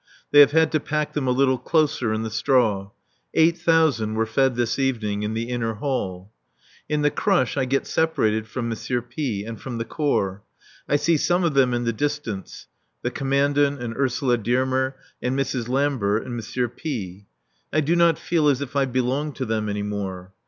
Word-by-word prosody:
They 145 - +7
have 145 -1 +9
had 160 +1 +3
to 155 - +2
pack 150 +1 -2
them 140 -3 -1
a - - +2
little 130 0 +2
closer 155 -7 +1
in 110 +1 -1
the 110 - -4
straw. 110 -4 +1 0.5
Eight 165 +1 +5
thousand 160 -11 +2
were 110 0 +1
fed 130 +3 +1
this 120 +2 -1
evening 110 -6 -1
in 105 +1 -2
the 115 - -1
inner 115 -2 -2
hall. 105 -6 -3 0.6
In 150 -1 0
the 145 - +3
crush 130 -2 +1
I 135 -2 +1
get 135 +2 0
separated 110 -10 0
from 115 +1 -3
M. 120 +2 -2
P 120 -11 -3
and 115 -2 -7
from 125 -3 -5
the 115 - -3
Corps. 105 -9 -1 0.5
I - - +3
see 155 +3 +2
some 175 +4 +1
of 165 -3 +1
them 135 -2 +4
in 120 0 -1
the 115 -1 0
distance, 140 -6 -4 0.4
the - - -1
Commandant 140 +1 +1
and 120 -1 -5
Ursula 130 -2 +1
Dearmer 130 +3 0 0.3
and 125 +2 -1
Mrs. 130 -3 -2
Lambert 130 -6 +1
and 125 - -6
M. 120 +3 -2
P. 105 - -6 0.4
I 155 - +2
do 155 +3 +2
not 170 -2 +4
feel 165 -3 +1
as 140 -3 +3
if 140 -1 -6
I 140 -1 +3
belonged 130 +3 -1
to 130 - -3
them 110 -2 -1
any 105 0 -2
more. 95 -3 -5
130 Hz, 195 wpm, -23 LUFS, 110-145 Hz, 0.6 s, have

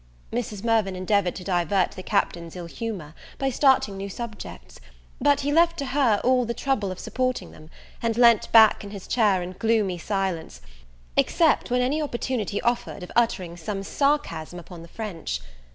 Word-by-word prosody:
Mrs. 215 -4 -3
Mirvan 220 -5 +2
endeavourd 185 0 +1
to 185 - -7
divert 180 0 +1
the - - -8
Captain's 170 -4 -1
ill 175 -1 -6
humour, 175 -4 -6 0.2
by 270 -1 0
starting 260 -7 +3
new 200 +1 -5
subjects: 195 - -8 0.4
but 285 -1 +4
he 285 +1 -1
left 335 +1 +4
to 280 - -3
her 255 -6 +2
all 255 0 +3
the 235 0 -3
trouble 240 -9 -1
of 185 - -6
supporting 255 +3 -2
them, 155 0 -15 0.3
and 230 -1 0
leant 235 -3 +5
back 220 -2 +7
in 205 - -7
his 200 -2 -8
chair 205 -6 +2
in 180 - -6
gloomy 215 -6 +1
silence, 185 - -3 0.6
except 325 -6 +3
when 250 0 +2
any 280 +5 +1
opportunity 240 -7 -2
offered 240 -5 -1
of 180 - -9
uttering 195 -8 +1
some 195 +4 -4
sarcasm 195 - -1
upon 175 0 -10
the 165 - -11
French. 170 - -5
210 Hz, 170 wpm, -25 LUFS, 180-245 Hz, 0.6 s, back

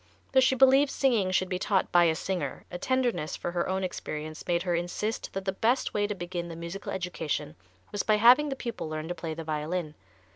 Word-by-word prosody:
Though 265 - +5
she 260 0 +4
believed 270 +2 +6
singing 235 -10 +2
should 185 0 +1
be 185 0 -2
taught 190 0 +1
by 175 -1 +6
a 160 -1 +3
singer, 160 -5 -3
a 180 - -5
tenderness 240 -10 0
for 175 - -4
her 175 0 -1
own 190 0 -1
experience 155 -3 -5
made 170 -1 +1
her 180 -2 0
insist 175 +6 -2
that 195 0 -4
the 190 - +1
best 235 +7 +1
way 205 0 +1
to 210 - -3
begin 175 -1 -4
the 165 - -7
musical 170 +4 -6
education 180 - -3 0.4
was 205 - -1
by 215 - +3
having 245 +7 +6
the 270 - -2
pupil 235 -10 -5
learn 155 0 -4
to - - -1
play 165 -2 -5
the 165 - -6
violin. 155 +1 -3
185 Hz, 220 wpm, -28 LUFS, 170-220 Hz, 0.4 s, believed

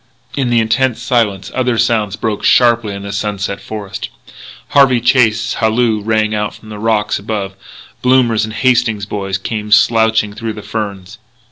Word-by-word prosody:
In 135 -3 0
the 120 -1 +3
intense 115 +2 +1
silence 115 -6 0
other 125 -2 0
sounds 105 -3 +1
broke 105 -2 -3
sharply 120 -4 +3
in 100 - -7
the 100 - -6
sunset 100 -1 -3
forest; 100 -2 -6 0.6
Harvey 135 -4 +4
Chase's 115 -2 +2
halloo 110 -1 +1
rang 110 0 0
out 105 -1 -2
from 110 - -15
the 105 -1 -8
rocks 110 -1 0
above; 100 -2 -4 0.5
Blommers 125 -4 +3
and 110 - -3
the - - -7
Hastings 115 -4 +1
boys 100 -2 -3
came 105 +1 -5
slouching 110 -2 +3
through 115 +1 -4
the 105 - -9
ferns. 100 -4 -5
110 Hz, 160 wpm, -15 LUFS, 105-120 Hz, 0.6 s, Harvey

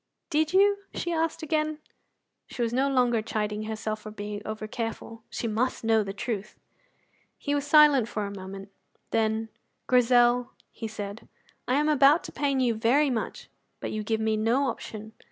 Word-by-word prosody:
"Did 310 +1 +2
you?" 400 +2 +4 0.2
she 345 - -2
asked 325 0 -1
again. 310 0 0 0.7
She 245 - -3
was 230 0 -1
no 270 +3 +2
longer 245 -4 +2
chiding 210 0 -2
herself 215 0 -4
for 215 - -8
being 205 0 -6
over 215 0 -4
careful; 225 -1 -5
she 235 - -3
must 230 +4 -1
know 225 -1 +3
the 195 -2 -4
truth. 210 0 -4 0.8
He 285 - -2
was 290 0 -1
silent 290 -5 +6
for 210 -2 -3
a 200 - -5
moment. 195 +1 -8 0.4
Then, 220 0 0 0.4
"Grizel," 245 0 +4 0.2
he 225 - -6
said, 210 0 -7 0.4
"I 255 - +2
am 300 +2 +2
about 295 +1 +5
to - - -8
pain 275 -1 0
you 245 -3 +2
very 255 +6 +3
much, 230 -3 -4 0.3
but - - -4
you 215 - -2
give 220 +1 -1
me 220 0 +1
no 240 +6 +2
option. 220 -1 -7
230 Hz, 170 wpm, -27 LUFS, 215-275 Hz, 0.8 s, silent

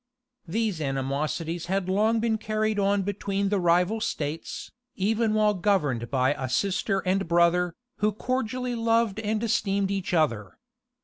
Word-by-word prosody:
These 210 -2 -1
animosities 150 +5 -2
had 190 0 -1
long 215 +4 +2
been 220 -1 0
carried 215 0 -1
on 200 0 +2
between 200 0 -1
the 205 -1 +1
rival 180 +5 +2
states, 155 -4 -4 0.2
even 215 +2 +1
while 215 -1 +3
governed 150 - 0
by 130 0 +2
a 135 -3 -4
sister 195 - 0
and 190 0 +1
brother, 170 +1 +3 0.2
who 210 +1 +2
cordially 250 +2 -2
loved 230 -2 +1
and 215 0 -1
esteemed 200 -3 +1
each 195 -2 -2
other. 130 - 0
195 Hz, 140 wpm, -26 LUFS, 170-215 Hz, 0.2 s, while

